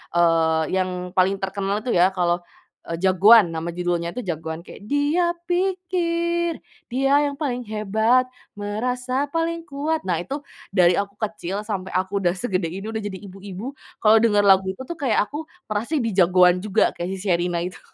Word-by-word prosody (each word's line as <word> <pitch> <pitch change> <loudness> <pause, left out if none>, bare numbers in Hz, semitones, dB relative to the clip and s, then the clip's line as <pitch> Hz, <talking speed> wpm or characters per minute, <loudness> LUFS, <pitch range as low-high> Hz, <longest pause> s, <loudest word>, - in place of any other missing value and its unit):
eee, 165 -2 +3
yang 185 0 +1 0.3
paling 190 +2 +4
terkenal 195 +2 -2
itu 245 - -2
ya, 180 +2 +5
kalau 175 -1 +1 0.4
Jagoan, 190 +5 +5
nama 165 +1 -3
judulnya 175 -1 -2
itu 250 - -6
Jagoan, 160 -1 -4
kayak, 175 - -13
"Dia 310 +5 +2 0.2
pikir, 345 -2 0 0.3
dia 270 +2 +2 0.2
yang 280 - -11
paling 250 -5 -2
hebat, 220 +4 +1 0.3
merasa 250 +6 -2
paling 330 0 -1
kuat", 305 +1 -2
nah, 175 -3 0
itu 275 +11 -5 0.2
dari 180 -3 +4
aku 200 0 -4
kecil 205 -2 -4
sampai 190 -4 -4
aku 190 +2 0
udah 180 -1 +1
segede 185 -4 -1
ini 190 +4 -6
udah 220 - -3
jadi 205 -2 -5
ibu-ibu 195 +4 -7 0.3
kalau 220 +1 +7
denger 210 -2 +3
lagu 190 -1 +5
itu 190 +7 -4
tuh 325 +4 -7
kayak 250 -8 +2
aku 310 +2 -5 0.2
merasa 225 +9 -1
jadi 205 - +3
Jagoan 180 0 +5
juga, 210 +2 +2
kayak 175 - -5
si - - -7
Sherina 175 -2 0
itu. 180 0 -6
205 Hz, 165 wpm, -23 LUFS, 180-260 Hz, 0.4 s, kalau